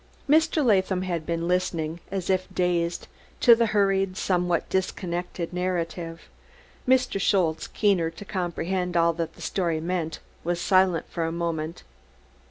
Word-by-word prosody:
Mr. 315 0 +3
Latham 190 -4 +2
had 170 -4 -3
been 170 0 -1
listening, 170 -3 -1
as 190 -2 -3
if 185 -1 0
dazed, 175 -1 0 0.3
to 240 - +8
the 230 0 +3
hurried, 195 -2 +1
somewhat 180 -2 0
disconnected, 180 -2 -3
narrative; 170 -2 -3 0.7
Mr. 255 -6 +2
Schultze, 175 -6 +1
keener 190 -6 +2
to 165 +5 -11
comprehend 180 -1 -2
all 170 0 +4
that 165 -1 -4
the - - -10
story 170 -4 0
meant, 165 -1 -2 0.3
was 175 0 -1
silent 185 -2 +3
for 170 - -3
a 165 - -2
moment. 165 -1 -3
180 Hz, 140 wpm, -26 LUFS, 170-190 Hz, 0.7 s, to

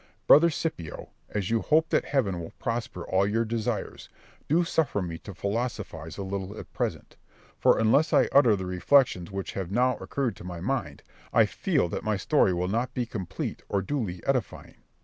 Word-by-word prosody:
Brother 170 +4 +7
Scipio, 145 - -4 0.2
as 105 -1 -2
you 115 -1 +2
hope 160 +1 +3
that - - +2
heaven 105 -11 0
will 80 - -8
prosper 115 -7 -3
all 95 +1 +2
your 115 +3 +1
desires, 110 -1 -3 0.4
do 165 +4 +3
suffer 160 -9 0
me 85 -3 -4
to 100 - -10
philosophise 100 -6 -4
a 100 - -4
little 95 +1 -5
at - - -10
present; - - -3 0.4
for - - +5
unless 140 +9 +3
I - - +4
utter 125 -6 +6
the 95 -1 -4
reflections 90 0 +3
which 95 -1 -4
have 95 -3 -4
now 125 +3 +2
occurred 135 -4 -2
to - - -11
my 90 -1 -6
mind, 85 - -3 0.3
I - - +5
feel - - 0
that - - -4
my - - 0
story - - +3
will 90 0 -1
not 115 +6 -1
be 125 - 0
complete 100 -7 -5
or 100 -1 0
duly 100 -9 -3
edifying. 135 -3 -2
105 Hz, 185 wpm, -27 LUFS, 90-130 Hz, 0.4 s, Brother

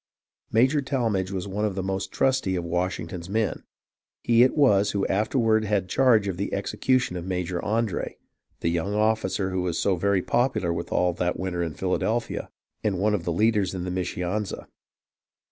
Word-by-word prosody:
Major 130 +6 +3
Tallmadge 115 -9 -1
was 95 -1 -4
one 100 +2 -3
of 105 -3 0
the 95 - -2
most 95 0 -3
trusty 130 -8 +1
of 90 - -2
Wash 90 +2 -1
ington's 85 +1 -7
men. 110 +1 0 0.6
He 115 0 +4
it 130 +4 +4
was 105 -8 +4
who 100 -1 0
afterward 110 +1 +2
had 100 -3 0
charge 115 -4 +4
of 95 -3 -3
the 100 - -3
execution 125 +2 0
of 90 - -4
Major 90 -1 -2
Andre, 110 -3 -1 0.4
the 85 - +1
young 85 +5 -1
officer 105 -2 +1
who 95 0 -1
was 90 -2 -1
so 100 - +2
very 95 +1 +1
popular 120 -9 +1
with 85 - -5
all 90 -1 +2
that 90 0 -1
winter 90 -2 -2
in 80 -3 -3
Philadelphia, 110 +6 -1 0.3
and 100 -3 0
one 105 +3 +2
of 90 -4 -1
the 85 - 0
leaders 105 +1 +2
in 90 - -3
the 90 - -3
Mischianza. 90 +3 -3
95 Hz, 180 wpm, -25 LUFS, 90-110 Hz, 0.6 s, He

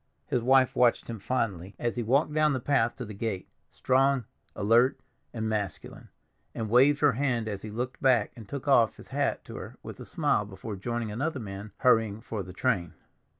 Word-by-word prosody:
His 125 - 0
wife 130 +1 +4
watched 120 -1 +2
him 115 - -6
fondly 100 -5 -2
as 120 -1 -2
he 120 - -1
walked 135 +7 +2
down 155 -1 +3
the 130 - -1
path 120 -3 +1
to 125 - -6
the 105 - -8
gate, 100 -2 -3 0.2
strong, 135 0 +2 0.3
alert, 115 +5 +3 0.3
and 110 -1 -3
masculine, 105 -3 -4 0.5
and 110 -2 -3
waved 140 +4 +5
her 145 -1 +5
hand 120 -3 -1
as 100 -2 -4
he 110 - -7
looked 125 +4 -4
back 125 -6 +3
and 115 -4 -12
took 140 0 -6
off 120 -6 +4
his - - -14
hat - - -1
to - - -8
her - - -9
with - - -9
a - - -8
smile - - +1
before 100 +2 -7
joining 115 +2 -3
another 140 +6 -2
man 100 -1 -7
hurrying 110 -4 +3
for 110 -2 -5
the 90 -1 -8
train. 90 -4 -1
115 Hz, 195 wpm, -28 LUFS, 105-130 Hz, 0.5 s, waved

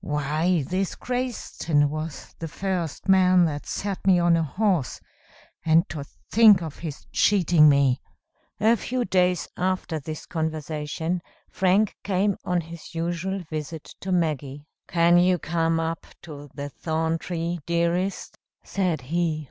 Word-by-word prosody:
Why 150 +3 0
this 185 +1 -1
Crayston 245 - -1
was 155 0 -6
the 165 - -4
first 180 -1 -3
man 185 -2 +5
that 145 -2 -3
set 195 -1 -4
me 185 -2 +6
on 175 -1 +4
a 165 - +2
horse 175 - 0 0.6
and 165 +1 +4
to 150 -3 -5
think 210 +4 +4
of 155 -2 -7
his 155 -4 -7
cheating 175 -6 +5
me!" 140 -2 +3 0.6
A 225 +2 +4
few 250 +1 -2
days 180 -1 +2
after 185 -3 -1
this 155 +2 -7
conversation, 160 +1 -3 0.3
Frank 195 +3 +2
came 200 0 +1
on 180 -1 0
his 165 +1 -11
usual 175 +3 -2
visit 155 0 -5 0.2
to 190 - -4
Maggie. 150 -5 -1 0.2
"Can 170 0 +4
you 180 0 +4
come 165 -1 0
up 165 0 -3 0.2
to 145 -3 -10
the 145 0 -5
thorn 160 +2 -1
tree, 170 0 -3
dearest?" 170 +3 -1 0.2
said 180 -7 -1
he. 160 +3 -1
170 Hz, 140 wpm, -25 LUFS, 155-185 Hz, 0.6 s, me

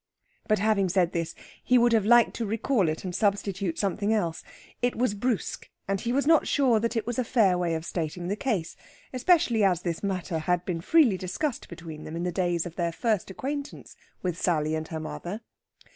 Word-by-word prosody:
But 215 - +3
having 200 -2 +2
said 180 -1 +2
this, 165 -2 -3 0.3
he 250 - +4
would 240 0 +4
have 215 -3 +3
liked 240 0 +6
to 230 - -2
recall 220 - +1
it 155 - -4
and 185 -2 -4
substitute 200 -3 0
something 200 +1 0
else. 175 -7 0 0.4
It 245 0 +1
was 245 -3 +1
brusque, 225 +1 -2 0.2
and 195 0 -1
he 235 - -1
was 275 +3 +1
not 320 0 +4
sure 255 -6 +3
that 230 +2 -1
it 225 -2 -1
was 240 +1 -2
a - - +2
fair 220 -6 +3
way 175 -2 0
of 160 0 -4
stating 170 +1 -3
the 200 - -1
case, 210 -9 -2 0.4
especially 255 - +3
as 180 -3 +2
this 170 -2 -2
matter 185 -4 -2
had 180 +2 0
been 170 -3 -2
freely 260 - +4
discussed 230 - -3
between 160 -2 -9
them 155 - -7
in 170 - -3
the 180 - -1
days 175 -2 0
of 175 -1 -8
their 170 -2 0
first 215 +2 -1
acquaintance 280 +8 -6 0.3
with 180 -2 -2
Sally 155 -3 +1
and 160 0 -2
her 160 - -5
mother. 175 +6 -6
195 Hz, 205 wpm, -27 LUFS, 170-230 Hz, 0.4 s, liked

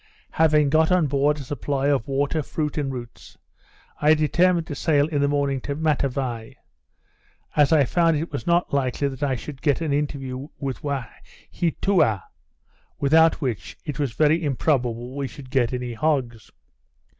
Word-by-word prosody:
Having 150 -3 +3
got 160 +2 +3
on 180 -3 +4
board 145 +1 +1
a - - -7
supply 140 0 -2
of 140 -5 +1
water, 140 +3 0
fruit, 150 +1 -3
and 145 -3 -2
roots, 120 -3 -9 0.6
I 150 +1 +5
determined 170 +3 +2
to 150 - -6
sail 145 -1 +2
in 150 -3 -1
the 140 - +3
morning 140 -2 0
to 140 - -4
Matavai, 135 -6 -2 1.0
as 150 +1 +4
I 150 -4 +5
found 165 +3 +2
it 160 +3 -4
was - - -5
not 175 -2 +2
likely 140 0 0
that 135 0 -9
I 140 -2 +1
should 135 +3 -8
get 145 -3 +2
an 160 -4 -1
interview 140 -2 -3
with 135 -3 -4
Waheatoua, 140 - -1 0.8
without 160 +4 +4
which, 110 - -4
it 150 -2 -5
was 140 -6 -1
very 155 +5 +2
improbable 125 -4 -1
we 140 -1 -2
should 130 -2 -12
get 125 -4 +2
any 125 -1 -4
hogs. 125 -5 -1
145 Hz, 160 wpm, -23 LUFS, 130-155 Hz, 1.0 s, I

